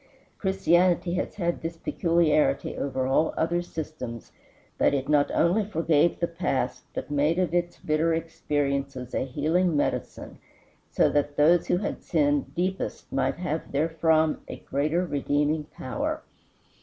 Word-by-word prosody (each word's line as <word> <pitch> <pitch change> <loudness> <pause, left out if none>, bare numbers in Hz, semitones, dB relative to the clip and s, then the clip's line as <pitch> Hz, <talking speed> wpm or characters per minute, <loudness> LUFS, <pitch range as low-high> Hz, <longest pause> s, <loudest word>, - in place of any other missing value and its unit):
Christianity 180 -2 +2
had 175 -1 -2
this 165 0 -5
peculiarity 160 -5 +1
over 130 -2 -2
all 135 +5 +2
other 170 +2 +1
systems, 155 -9 -7 0.5
that - - +3
it 135 -1 -2
not 145 -1 +3
only 185 +6 +2
forgave 165 -4 +2
the 170 - +2
past, 135 -6 -2
but - - -5
made 145 +3 +2
of 180 -3 0
its 175 0 0
bitter 155 +2 +1
experiences 140 -5 -2
a - - 0
healing 155 +5 +1
medicine; - - -3 0.5
so - - +3
that 145 0 0
those 165 +4 +4
who - - +2
had 200 - -3
sinned 145 -3 0
deepest 185 +2 -3
might 135 - +1
have 165 -3 -3
therefrom 160 +1 +2
a - - -6
greater 155 +6 -1
redeeming 145 0 0
power. - - -4
160 Hz, 135 wpm, -26 LUFS, 145-170 Hz, 0.5 s, those